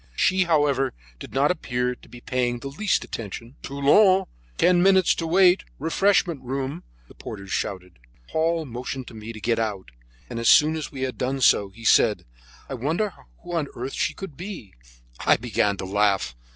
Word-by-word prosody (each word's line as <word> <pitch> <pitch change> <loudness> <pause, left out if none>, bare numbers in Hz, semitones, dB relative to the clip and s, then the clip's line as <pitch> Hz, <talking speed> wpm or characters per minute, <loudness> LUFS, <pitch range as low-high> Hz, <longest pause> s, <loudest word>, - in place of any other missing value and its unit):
She, 185 -1 +2
however, 145 -5 +2 0.3
did - - -9
not 140 +4 +2
appear 125 -7 -2
to - - -18
be 120 - -12
paying 125 -1 -1
the 135 +3 -7
least 190 +9 0
attention. 115 +3 -7
"Toulon! 185 +8 +4 0.3
Ten 180 -1 +4
minutes 190 -1 +5
to 165 - -4
wait! 180 +2 +4
Refreshment 170 0 +1
room!" 135 +5 -4 0.2
the - - -16
porters 100 -3 -9
shouted. 90 -7 -4 0.3
Paul 165 0 0
motioned 125 +1 -6
to - - -14
me 110 0 -8
to 110 - -9
get 115 +2 0
out, 100 - -3 0.4
and 115 - -5
as 115 - +2
soon 155 +1 +6
as 155 -2 -5
we 135 - -7
had 130 -1 -4
done 135 +1 -1
so, 100 -5 +4
he 115 +4 -14
said: - - +4 0.4
"I - - -6
wonder 160 - -1 0.3
who 175 0 -7
on 160 -4 0
earth 130 +3 -5
she - - -1
can 195 -4 -7
be?" 175 - -9 0.5
I - - +3
began 110 -3 0
to 95 - -5
laugh. 100 -7 +1
135 Hz, 180 wpm, -24 LUFS, 115-165 Hz, 0.5 s, soon